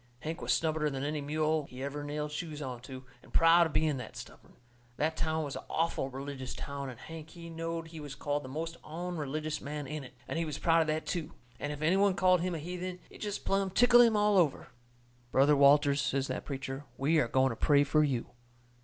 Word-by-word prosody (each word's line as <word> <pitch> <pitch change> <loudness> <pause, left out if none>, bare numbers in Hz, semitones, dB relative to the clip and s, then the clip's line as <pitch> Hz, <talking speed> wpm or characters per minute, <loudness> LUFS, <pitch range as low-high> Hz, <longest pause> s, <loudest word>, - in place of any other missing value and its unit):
Hank 160 +3 -4
was - - 0
stubborner 155 -2 +1
than 135 0 -3
any 150 +1 -2
mule 155 +1 0
he 125 +1 -7
ever 145 +1 -4
nailed 150 +1 -3
shoes 150 -1 -5
onto, 130 -1 -7 0.2
and - - -18
proud 165 +1 +6
of 155 - -10
being 155 -3 +2
that 125 - -8
stubborn. - - -11 0.4
That 160 +2 0
town 160 -1 0
was 140 -2 -5
a - - -6
awful 165 -4 0
religious 135 -1 -6
town, 140 -1 -5
and 120 - -10
Hank 160 -1 -9
he 170 0 -10
knowed 165 0 -4
he 160 -1 -9
was 145 -2 -7
called 145 +1 -1
the 130 - -8
most 165 +4 -4
onreligious 155 -2 -4
man 145 0 -5
in 150 +1 -5
it, 130 0 -12
and 165 - -2
he 165 - 0
was 150 -3 -4
proud 165 -1 +4
of 160 - 0
that 155 +1 -1
too; 165 -2 -3 0.3
and 145 - -3
if 150 +1 -5
any 170 +5 +4
one 200 -1 +4
called 185 -1 +4
him 180 -1 -1
a - - -2
heathen 180 +3 -5
it - - -13
jest 205 -1 -4
plumb 195 0 +1
tickled 240 +5 +6
him 230 -3 +5
all 210 -1 +4
over. 155 -6 +1 0.6
"Brother 140 +3 +5
Walters," 140 0 +5
says 130 +1 0
that - - -3
preacher, 135 0 -5
"we 155 +4 +3
are 125 - +2
going 130 +2 +3
to - - -4
pray 145 +3 +4
for 155 +2 +3
you." 130 -5 -1
155 Hz, 225 wpm, -31 LUFS, 140-165 Hz, 0.6 s, proud